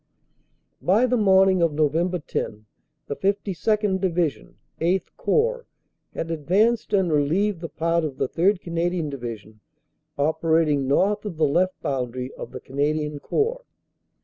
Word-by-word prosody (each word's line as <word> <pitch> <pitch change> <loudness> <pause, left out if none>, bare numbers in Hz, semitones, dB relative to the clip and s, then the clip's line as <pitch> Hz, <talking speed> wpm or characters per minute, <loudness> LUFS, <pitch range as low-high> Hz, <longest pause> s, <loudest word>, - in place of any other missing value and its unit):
"By 210 +7 +3
the 250 0 +1
morning 190 -4 +4
of 165 -3 +2
Nov. 150 -1 +2
10, 165 -10 -2 0.4
the 145 - -4
52nd. 200 +1 0
Division 170 -5 -1 0.2
(VIII 180 +3 +1
Corps) - - 0 0.5
had 165 - -3
advanced 200 +9 +1
and 190 -4 +2
relieved 165 +6 +1
the 165 - -5
part 165 +2 0
of 145 -4 -4
the - - 0
3rd. 180 +7 +1
Cana 170 0 -1
dian 170 -5 -3
Division 115 -5 -7 0.6
operating 155 -1 +2
north 200 +9 +2
of 200 -7 -6
the 155 - +3
left 180 +6 +1
boundary 125 -1 -3
of - - -8
the - - -7
Can 135 - -12
adian 150 0 0
Corps. 475 +3 -1
170 Hz, 145 wpm, -24 LUFS, 150-195 Hz, 0.6 s, morning